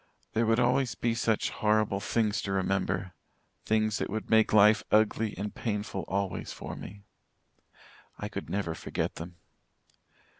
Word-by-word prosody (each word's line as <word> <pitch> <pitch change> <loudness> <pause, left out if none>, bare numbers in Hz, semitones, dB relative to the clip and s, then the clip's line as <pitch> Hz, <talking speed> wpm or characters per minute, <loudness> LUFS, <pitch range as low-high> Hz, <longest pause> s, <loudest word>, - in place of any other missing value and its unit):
There 115 0 +2
would 115 +1 +3
always 125 +1 +2
be 115 -1 0
such 115 -1 0
horrible 105 -2 +1
things 105 0 0
to 100 - -4
remember 95 -1 -1 0.5
things 110 -1 +1
that - - -2
would 110 +2 -4
make 110 -1 +5
life 105 +1 +6
ugly 110 0 +2
and 105 +2 -4
painful 105 -3 -3
always 100 -1 -2
for - - -7
me. 100 +1 -10 1.1
I - - -4
could - - -6
never 95 -5 -1
forget 80 - -3
them. 85 +2 -8
105 Hz, 145 wpm, -29 LUFS, 100-110 Hz, 1.1 s, life